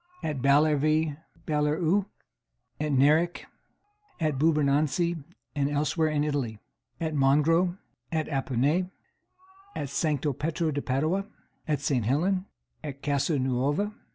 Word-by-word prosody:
At 150 -4 -2
Ballervie 150 +2 +3 0.3
(Balleruc). 160 +6 +1 0.7
At 150 0 -1
Neric. 150 +6 +3 0.8
At 155 -5 0
Bourbonansie, 155 +2 +2 0.3
and 140 -1 +1
elsewhere 155 +3 +1
in 150 -1 +1
Italy. 140 -7 -2 0.4
At 160 -1 -2
Mongros. 155 +6 +3 0.3
At 160 -2 0
Appone. 140 +6 0 0.9
At 140 - -3
Sancto 145 0 0
Petro 160 +4 -1
de 145 0 -2
Padua. 155 +10 0 0.4
At 150 -2 0
St. 140 -5 +1
Helen. 185 - +1 0.4
At 140 -2 -7
Casa 145 +1 +1
Nuova. 135 +10 0
150 Hz, 110 wpm, -27 LUFS, 140-160 Hz, 0.9 s, Ballervie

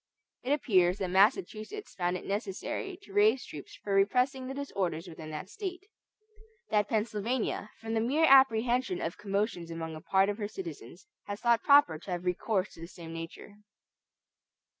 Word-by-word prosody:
It 255 - -3
appears 185 -10 +3
that 185 -3 -3
Massachusetts 220 - +1
found 180 0 -1
it - - -10
necessary 210 - -3
to 395 - -14
raise 410 -10 +4
troops 145 -2 -10
for 200 - -2
repressing 250 +7 +2
the 270 - -5
disorders 190 - -3
within 160 -2 -9
that 155 +3 -6
State; 375 - -6 0.9
that 210 -1 +2
Pennsylvania, 220 0 -1
from 225 0 -5
the 225 - +2
mere 285 +8 +3
apprehension 250 - +4
of 165 - -4
commotions 200 -4 -2
among 165 -1 -5
a 155 - -9
part 190 +3 +3
of 205 +2 -2
her 205 - -2
citizens, 345 - -8 0.2
has 205 0 -5
thought 235 -1 +3
proper 280 - +5
to 180 - -12
have 180 0 -3
recourse 185 +2 0
to - - -13
the 165 - -6
same 165 -2 -10
measure. 165 +5 -8
210 Hz, 165 wpm, -30 LUFS, 180-255 Hz, 0.9 s, proper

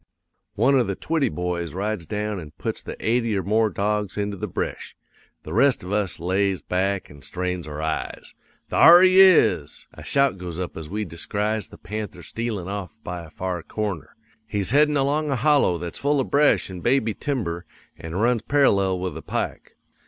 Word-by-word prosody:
"'One 135 0 +4
of 120 - +1
the 100 - -2
Twitty 160 - 0
boys 85 +1 -3
rides 100 -3 -3
down 105 -1 -3
an' 75 -3 -10
puts - - -3
the - - -7
eighty 115 -2 +1
or 95 - -1
more 110 +4 +2
dogs 105 0 -2
into 100 0 -2
the 95 - -4
bresh. - - -4 0.5
The 75 - -7
rest 130 +2 +3
of 90 - -7
us 100 -4 -1
lays 95 +2 0
back 95 +1 -1
an' 70 -1 -14
strains 90 0 -4
our 75 +1 -5
eyes. 80 0 -4 0.4
Thar 175 +2 +8
he 185 0 +6
is! 110 - +4
A - - -11
shout 140 -8 +1
goes 90 -2 -6
up 90 -1 -4
as 80 -2 -7
we 105 +2 -3
descries 105 +5 -2
the - - -14
panther 105 -2 -6
stealin' 110 -5 -4
off 100 +2 -6
by 90 -1 -5
a 80 - -12
far 90 +2 -4
corner. 95 -6 -5 0.3
He's 100 -2 -1
headin' 150 +1 +4
along 145 +3 +1
a 135 - +1
hollow 135 - +3
that's 85 0 -6
full 145 0 +1
of 130 - -2
bresh 145 +1 +4
an' 90 - -7
baby 120 +1 +1
timber 100 - -3 0.3
an' 80 +1 -8
runs 115 +3 +2
parallel 100 -10 +2
with 90 0 -3
the - - -7
pike. - - -4
100 Hz, 190 wpm, -23 LUFS, 90-120 Hz, 0.5 s, Thar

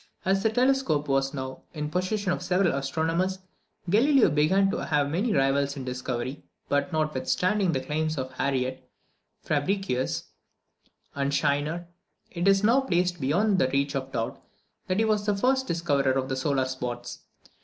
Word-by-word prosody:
As 195 +1 +2
the 220 - +2
telescope 250 - +1
was 135 0 +1
now 130 -1 -6
in 150 -1 -3
the 150 - -5
possession 185 +2 -1
of 180 - -2
several 180 0 +2
astronomers, 165 +7 -1 0.5
Galileo 245 - +4
began 185 +7 +3
to - - -3
have 145 -2 +1
many 200 +9 0
rivals 140 -1 +1
in 135 - -5
discovery; 125 +1 -4 0.3
but 145 +4 0
notwithstanding 170 +6 +1
the 135 -4 -1
claims 155 +2 -2
of 130 -1 -3
Harriot, 130 -1 -2 0.5
Fabricius, 150 -3 -1 0.9
and 140 0 -1
Scheiner, 145 +4 0 0.5
it 175 +2 -1
is 195 0 +4
now 235 +5 +5
placed 180 - 0
beyond 185 +9 +2
the 130 - +2
reach 140 +1 0
of 135 0 -3
doubt 115 -2 -3 0.5
that 185 - 0
he 220 - +3
was 210 -1 0
the 205 -1 +2
first 265 +4 +1
discoverer 145 - +1
of 130 0 -1
the 130 - -1
solar 135 0 0
spots. 125 -2 -5
155 Hz, 160 wpm, -27 LUFS, 135-195 Hz, 0.9 s, now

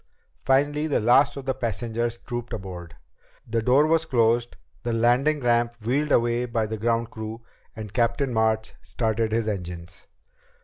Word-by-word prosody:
Finally 145 +4 +2
the 145 - +1
last 135 +6 +4
of 135 - -7
the 130 - 0
passengers 115 +1 -2
trooped 120 -1 -6
aboard. 90 -5 -7 0.5
The 115 0 0
door 130 +6 +4
was 165 +1 +2
closed, 120 -2 +2 0.3
the 120 - -2
landing 125 +6 +2
ramp 120 -1 +2
wheeled 145 +5 0
away 120 +1 +2
by 115 -2 0
the 110 0 -5
ground 115 +1 0
crew, 110 +1 -7 0.3
and 110 -2 -8
Captain 120 +2 +1
March 110 -1 +1
started 110 -1 -1
his 115 0 0
engines. 90 -3 -6
115 Hz, 150 wpm, -25 LUFS, 110-125 Hz, 0.5 s, last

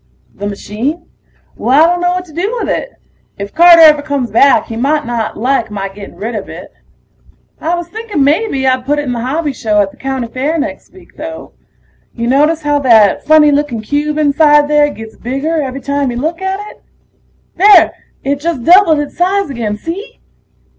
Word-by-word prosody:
The 205 - -6
machine? 230 - -4 0.5
Well, 285 +6 +3
I 350 - +2
dunno 355 0 0
what 365 0 -4
to 315 - -17
do 395 +9 -2
with - - -3
it. - - -3 0.4
If 200 0 -7
Carter 340 0 +7
ever 305 -2 +6
comes 285 -6 -3
back 275 +5 +4
he 225 - -7
might 290 +6 0
not 235 -2 -3
like 245 0 0
my 195 -2 -5
getting 200 -1 -11
rid 215 +6 -5
of 210 -3 -6
it. - - -10 0.9
I 335 +3 -1
was 345 -1 -5
thinking 420 -6 -3
mebbe 285 -1 0
I'd 255 -1 +1
put 290 +3 -1
it 295 - -1
in 260 - -3
the 240 - -3
hobby 285 +5 -2
show 215 -4 -1
at 200 -1 +1
the - - -21
county 265 -3 -4
fair 275 +7 -2
next 295 -1 -5
week, 375 - -19
though. 320 +1 -8 0.6
Ya 235 0 -3
notice 300 +5 +2
how 290 0 +1
that 225 -7 +4
funny 305 -1 +5
looking 285 -6 -1
cube 295 +5 -2
inside 295 0 +3
there 295 0 +3
gets 225 -5 -10
bigger 285 +6 -2
every 270 -1 -5
time 280 -1 -1
you 240 - -4
look 320 +7 -3
at 380 +1 -2
it? - - -21 0.8
There... 405 +2 +6 0.3
it 280 +1 -1
just 310 -5 -3
doubled 345 0 +5
its 295 -1 -4
size 375 -2 0
again, 220 -5 -3
see? 400 - -7
290 Hz, 195 wpm, -13 LUFS, 245-325 Hz, 0.9 s, Carter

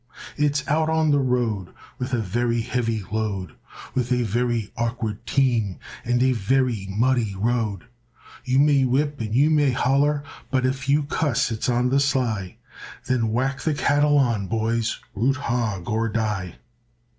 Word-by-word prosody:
It's 145 -1 0
out 155 +2 +1
on 160 -1 +2
the 145 - +4
road 120 -8 -1 0.3
With 125 +1 -3
a 125 - +1
very 115 +3 0
heavy 115 -2 -1
load, 100 -6 -2 0.4
With 125 -1 -1
a 125 -1 +2
very 120 0 -1
awkward 115 -3 -3
team 120 -8 +1 0.3
And 120 +1 +1
a 130 - +4
very 120 -2 0
muddy 115 0 +1
road, 110 -2 -1 0.6
You 130 0 +1
may 140 -1 +4
whip 140 +2 0
and 110 0 -3
you 145 +5 +4
may 145 -2 +4
holler, 140 +4 +1 0.3
But 130 -1 +1
if 130 +1 -2
you 145 +2 +3
cuss 145 -5 0
it's 110 +2 -2
on 125 +1 +2
the 135 +2 +3
sly; 125 -9 -1 0.5
Then 115 -4 0
whack 135 +4 -1
the 155 -2 0
cattle 145 +1 +3
on, 115 -8 +1
boys, 115 +1 -1 0.2
Root 125 +7 +1
hog 115 -9 -2
or 115 +1 0
die. 105 -4 -2
120 Hz, 155 wpm, -23 LUFS, 110-135 Hz, 0.6 s, the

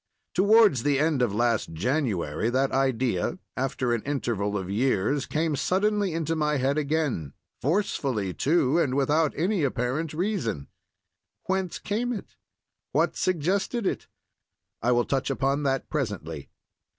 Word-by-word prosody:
Towards 205 - +5
the 145 +1 +2
end 150 -2 +2
of 120 -4 +2
last 115 -3 0
January 105 - 0
that 135 +2 +1
idea, 130 - 0 0.2
after 130 -2 -1
an 120 - 0
interval 110 -7 -1
of 95 -2 -4
years, 125 +5 +1
came 155 0 0
suddenly 200 +5 +1
into 165 0 -1
my 150 -1 +1
head 135 +2 +1
again—forcefully, 140 - -1
too, 155 - +2
and 135 -6 +1
without 150 +3 +2
any 180 +2 +1
apparent 135 +4 -1
reason. 165 - -2 0.7
Whence 190 -2 -1
came 235 +4 -2
it? 210 - -8 0.6
What - - +2
suggested 190 - 0
it? - - -2 0.7
I 120 - +2
will 120 -1 +3
touch 135 0 -1
upon 135 +1 0
that 135 0 -1
presently. 95 - -4
140 Hz, 130 wpm, -26 LUFS, 120-165 Hz, 0.7 s, Towards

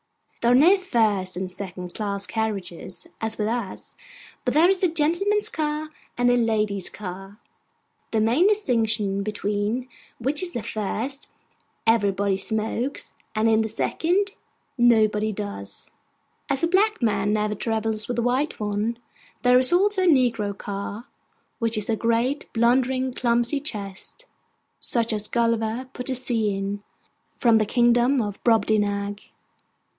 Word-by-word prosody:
There 235 - +3
are - - +6
no 330 +9 +7
first 215 - 0
and 185 0 -3
second 180 -1 -7
class 200 -2 -3
carriages 190 -4 -4 0.2
as 220 0 -1
with 210 - -1
us; 230 -4 -4 0.5
but 250 +1 -1
there 320 +3 +6
is 385 - -1
a 370 - +4
gentleman's 345 +6 +1
car 305 0 -2 0.3
and 245 0 +3
a - - +4
ladies' 215 -5 0
car: 195 +1 -8 0.7
the 225 - 0
main 240 - +3
distinction 225 - +1
between 210 +4 -2 0.3
which 275 +5 -1
is 365 -1 -2
that - - -2
in - - -14
the - - -9
first, 230 +6 -3 0.6
everybody 200 -3 +2
smokes; 220 +6 -3 0.2
and 215 +1 +2
in 220 0 +4
the 220 - -2
second, 355 - 0 0.5
nobody 215 -3 +3
does. 200 - -7 0.6
As 280 +2 -1
a - - +4
black 395 - +2
man 205 -2 +1
never 210 0 0
travels 220 0 -2
with 245 - -3
a 235 - +1
white 255 +5 0
one, 210 +2 -1 0.5
there 250 0 +6
is 255 +4 +8
also 390 +2 +3
a - - +3
negro 230 - +2
car; 200 +3 -6 0.5
which 230 -2 +1
is 210 - -2
a 225 - +1
great, 235 +5 0
blundering, 255 +2 +2
clumsy 240 +3 +1
chest, 210 - -6 0.5
such 230 -2 0
as 210 0 -2
Gulliver 230 +2 0
put 250 - -6
to 260 - +1
sea 230 -5 0
in, 200 +1 -3 0.6
from 230 -3 +4
the 215 - +2
kingdom 240 +3 +3
of 205 -3 -4
Brobdingnag. 205 -2 +1
225 Hz, 150 wpm, -24 LUFS, 205-255 Hz, 0.7 s, is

